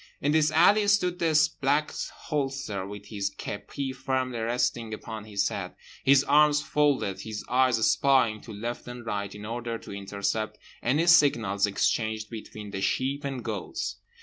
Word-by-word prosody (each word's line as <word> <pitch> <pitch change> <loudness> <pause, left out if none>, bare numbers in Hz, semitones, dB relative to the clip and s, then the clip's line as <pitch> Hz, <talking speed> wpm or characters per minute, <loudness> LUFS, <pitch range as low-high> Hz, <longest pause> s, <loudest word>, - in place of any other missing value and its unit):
In 145 - +1
this 155 0 +4
alley 200 +7 +5
stood 180 -3 +2
the 160 -2 +3 0.2
Black 145 +3 +2
Holster 135 - -3
with 100 0 -9
his 100 -2 -2
kepi 130 +7 -5
firmly 130 -2 -2
resting 115 -1 -1
upon 110 0 -8
his 100 -2 0
head, - - -5 0.3
his 135 0 +6
arms 150 +1 +5
folded, 145 -11 +1
his 110 -1 -6
eyes 130 -1 +3
spying 125 -6 +3
to 115 - -10
left 115 +4 -5
and 120 -1 -8
right 100 -2 -3
in 105 0 -8
order 115 +1 -4
to - - -11
intercept 100 +2 -3 0.2
any 145 +8 +2
signals 115 - +4
exchanged 110 +2 0
between 105 -2 -8
the 95 - -4
sheep 135 +7 0
and 135 -3 -4
goats. 105 -5 -4
120 Hz, 155 wpm, -27 LUFS, 105-140 Hz, 0.3 s, his